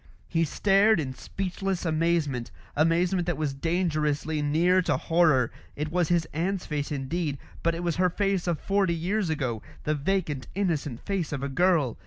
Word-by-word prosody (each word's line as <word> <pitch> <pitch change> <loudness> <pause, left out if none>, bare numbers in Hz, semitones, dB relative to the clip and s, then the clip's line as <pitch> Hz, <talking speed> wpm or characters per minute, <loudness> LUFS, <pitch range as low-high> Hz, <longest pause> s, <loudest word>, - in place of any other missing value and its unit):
He 165 -1 +1
stared 200 +6 +4
in 130 -4 -3
speechless 190 +4 -3
amazement 155 -6 0 0.3
amazement 170 +3 +2
that 175 - 0
was 150 -3 -1
dangerously 155 -1 0
near 170 +6 +3
to 180 - +1
horror. 155 -8 +3 0.2
It 150 +1 -3
was 175 -1 +2
his 170 -2 +2
aunt's 180 +4 -1
face 145 -1 -3
indeed, 145 +2 -2 0.2
but 170 0 +1
it 170 - -4
was 170 -2 -1
her 180 0 +3
face 195 0 0
of 170 -3 0
forty 195 -3 +1
years 185 +3 -1
ago, 125 -8 -1 0.2
the 155 - +1
vacant 150 -2 -1
innocent 155 - -1
face 195 -5 -1
of 140 -2 -3
a 140 - -1
girl. 160 -4 +2
165 Hz, 170 wpm, -27 LUFS, 150-180 Hz, 0.3 s, stared